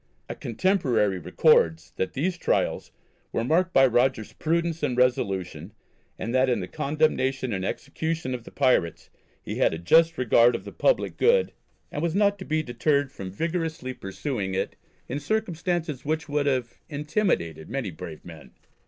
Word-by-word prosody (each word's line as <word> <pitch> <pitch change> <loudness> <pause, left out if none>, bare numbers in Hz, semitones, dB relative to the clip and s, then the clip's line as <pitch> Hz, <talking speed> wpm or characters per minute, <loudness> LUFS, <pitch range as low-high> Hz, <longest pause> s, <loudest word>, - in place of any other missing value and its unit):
A - - -4
contemporary 115 - +1
records 80 +1 +3
that 95 - -2
these 175 +7 -1
trials 170 - -1 0.4
were 115 - -1
marked 165 +7 +2
by 135 - +6
"Rogers's 120 -2 +1
prudence 165 0 -1
and 130 -4 -1
resolution, 95 -8 0 0.4
and 115 - -4
that 130 0 +3
in 120 -3 +1
the 90 - -4
condemnation 135 -4 0
and 95 -1 -2
execution 155 +5 -3
of 125 -2 -5
the - - -11
pirates 125 - +1 0.3
he - - -5
had - - +2
a - - -5
just 165 - +4
regard 120 -1 +4
of - - -6
the - - -7
public - - +1
good, 475 0 +3 0.4
and 145 - -3
was 170 0 -1
not 200 0 +3
to 190 - -7
be 155 0 0
deterred 140 +2 0
from 95 -6 -7
vigorously 160 - -3
pursuing 100 -2 -4
it 95 - -2 0.3
in 135 +4 -3
circumstances 175 - -2
which 155 +2 -2
would 145 -1 0
have 130 -4 -1
intimidated 145 - -1
many 130 -6 -3
brave 80 -1 -9
men." 80 -4 -12
135 Hz, 160 wpm, -26 LUFS, 105-160 Hz, 0.4 s, by